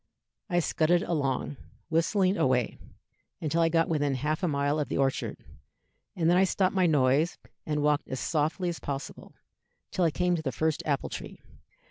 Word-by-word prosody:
I 175 -1 +2
scudded 170 +2 +2
along, 145 -3 -1 0.3
whistling 185 +4 +2
away, 130 - +1 0.6
until 165 +2 0
I 165 - +4
got 165 0 +2
within 145 -4 0
half 150 +4 -1
a 180 - +1
mile 145 0 0
of 150 - -1
the - - -1
orchard, 135 -1 0 0.8
and 165 -3 +1
then 175 +1 +5
I 190 - +5
stopped 190 0 +1
my 185 -2 +3
noise 145 +2 +2 0.3
and 150 -1 0
walked 150 0 +2
as 130 - -4
softly 160 +3 0
as 170 -2 -3
possible, 140 -1 -6 0.6
till 185 - 0
I 165 - +4
came 180 +3 +1
to 165 - -3
the 140 -4 -2
first 155 +5 0
apple 140 -2 0
tree. - - -7
155 Hz, 175 wpm, -28 LUFS, 145-175 Hz, 0.8 s, then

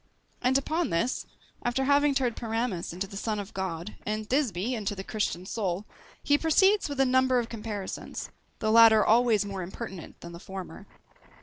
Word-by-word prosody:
And 255 +2 +3
upon 315 +5 -1
this, 170 +11 -1 0.3
after 245 +2 0
having 285 0 +4
turned 250 -4 +1
Pyramus 225 -5 -2
into 180 +3 -3
the 195 +1 -11
Son 215 +1 -2
of 205 +1 -6
God, 185 0 -4
and 215 0 -3
Thisbe 245 - 0
into 210 -3 -2
the 190 - -6
Christian 190 -4 -2
soul, 195 -2 -2 0.4
he 290 0 +3
proceeds 380 +4 +3
with 285 -1 -5
a 270 - +5
number 260 0 +3
of 235 -2 -1
comparisons; 210 -4 -6 0.3
the 215 -1 0
latter 225 -1 +7
always 225 -2 +4
more 195 -2 -5
impertinent 190 -1 -8
than 170 - -8
the 170 - -9
former. 190 0 -8
220 Hz, 175 wpm, -28 LUFS, 195-255 Hz, 0.4 s, latter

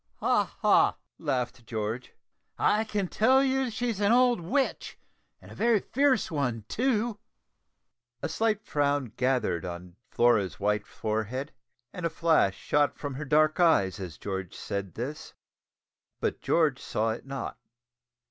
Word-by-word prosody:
"Ha! - - +1
ha!" - - +4 0.2
laughed 125 -2 -2
George, 110 +2 -4 0.4
"I 215 +1 +3
can 205 -3 -1
tell 260 +8 +4
you 265 0 +1
that 245 - -4
she's 230 -2 -2
an 205 +1 +3
old 245 -1 +4
witch, 260 - -1 0.4
and - - -15
a - - -9
very 230 -2 +3
fierce 260 -2 +1
one 125 -7 -1
too." 235 -3 0 1.0
A - - +1
slight 215 +5 0
frown 145 -5 0
gathered 125 -10 0
on 90 0 -7
Flora's 105 -10 +2
white 105 +1 0
forehead, 110 +6 -3 0.4
and 180 - -7
a 165 - +1
flash 160 - +2
shot 145 +5 +1
from 145 -2 -5
her 145 +3 -5
dark 155 +3 +3
eyes, 105 - +3
as 90 -5 -7
George 95 -2 -5
said 100 -2 -5
this, 135 +6 -6 0.8
but - - -2
George 155 -6 +2
saw 110 +1 -1
it 115 +4 -7
not. 135 -3 -5
145 Hz, 145 wpm, -28 LUFS, -, 1.0 s, ha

